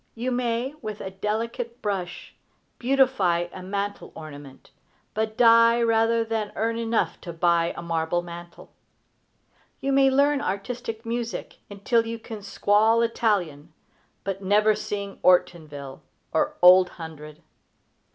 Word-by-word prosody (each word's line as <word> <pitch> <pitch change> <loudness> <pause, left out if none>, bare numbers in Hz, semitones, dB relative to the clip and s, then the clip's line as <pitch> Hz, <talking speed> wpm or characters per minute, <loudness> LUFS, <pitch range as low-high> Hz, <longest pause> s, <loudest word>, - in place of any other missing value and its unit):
You 245 +3 -2
may, 245 +2 -1
with 215 -1 -6 0.2
delicate 230 +3 -3
brush, 190 -4 -4 0.5
beautify 240 -10 +2
a 185 - -8
mantel 200 +2 -4
ornament, 145 -3 -11 0.4
but 220 0 -2
die 230 0 +6
rather 230 0 +2
than 220 -2 -2
earn 230 +1 -1
enough 230 0 -1
to 175 - -7
buy 170 0 +2
a - - -6
marble 165 +1 -1
mantel. 175 0 -11 1.1
You 275 - -1
may 270 0 +5
learn 280 +1 +3
artistic 225 +3 -4
music 235 0 -4
until 225 +3 0
you 230 0 -4
can 220 -1 -9
squall 210 +3 +2
Italian, 175 -10 -1 0.5
but 195 0 -4
never 210 +3 +3
sing 200 -1 -5
"Ortonville" 155 -6 +1 0.3
or - - 0
"Old 180 0 +8
Hundred." 155 -1 -10
210 Hz, 120 wpm, -25 LUFS, 175-230 Hz, 1.1 s, Old